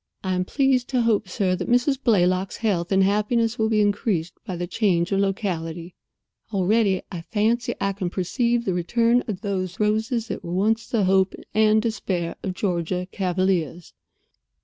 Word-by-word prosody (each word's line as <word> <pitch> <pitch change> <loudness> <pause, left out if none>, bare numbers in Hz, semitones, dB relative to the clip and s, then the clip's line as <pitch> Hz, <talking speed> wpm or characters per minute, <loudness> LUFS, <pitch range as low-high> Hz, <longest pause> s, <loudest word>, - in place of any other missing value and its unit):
I 190 -1 -1
am 180 0 0
pleased 265 +1 +1
to 250 -3 +1
hope, 215 -4 +1
sir, 185 -1 0
that - - -5
Mrs. 255 +3 +2
Blaylock's 185 -4 +2
health 190 -6 -1
and 190 0 +4
happiness 220 +4 +1
will 220 0 +2
be 215 -1 +3
increased 205 -4 0
by 185 - -5
the 175 +1 -3
change 175 -2 0
of 195 - +2
locality. 175 -4 -2 0.6
Already 200 0 +2
I 175 -3 -5
fancy 225 +6 0
I 195 0 0
can 190 -2 -3
perceive 235 +6 0
the 190 - 0
return 230 +7 +2
of 195 -4 -4
those 190 -3 -3
roses 220 +2 0
that - - -5
were 170 - -5
once 220 +5 +1
the 225 -4 +1
hope 190 0 +2 0.2
and 215 0 +4
despair 190 -6 -2
of 185 -1 -4
Georgia 180 -1 -2
cavaliers." 180 -4 -1
195 Hz, 170 wpm, -23 LUFS, 180-225 Hz, 0.6 s, and